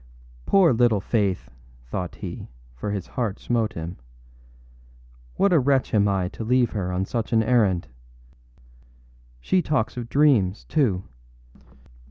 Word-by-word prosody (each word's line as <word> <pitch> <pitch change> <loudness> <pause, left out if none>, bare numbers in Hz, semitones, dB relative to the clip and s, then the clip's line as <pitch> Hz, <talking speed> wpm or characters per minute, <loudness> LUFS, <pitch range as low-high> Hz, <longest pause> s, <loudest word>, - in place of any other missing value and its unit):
âPoor 180 -9 +5
little 115 -3 +3
Faith!â 100 - -1 0.3
thought 90 +8 -5
he, - - -7 0.2
for - - -5
his 100 -3 -3
heart 110 -5 -3
smote 115 -3 -1
him. 85 +2 -6 1.4
âWhat 200 - +3
a 170 - +5
wretch 135 0 +1
am 105 -1 +4
I 95 -2 0
to 115 - -7
leave 125 +1 +2
her 95 -4 -3
on 90 +1 -1
such 115 +2 -3
an 110 0 +4
errand! 105 -7 +2 1.5
She 180 - +1
talks 150 -8 -1
of 120 -1 -5
dreams, 120 -10 +3
too. 110 - +1
110 Hz, 135 wpm, -24 LUFS, 95-125 Hz, 1.5 s, âPoor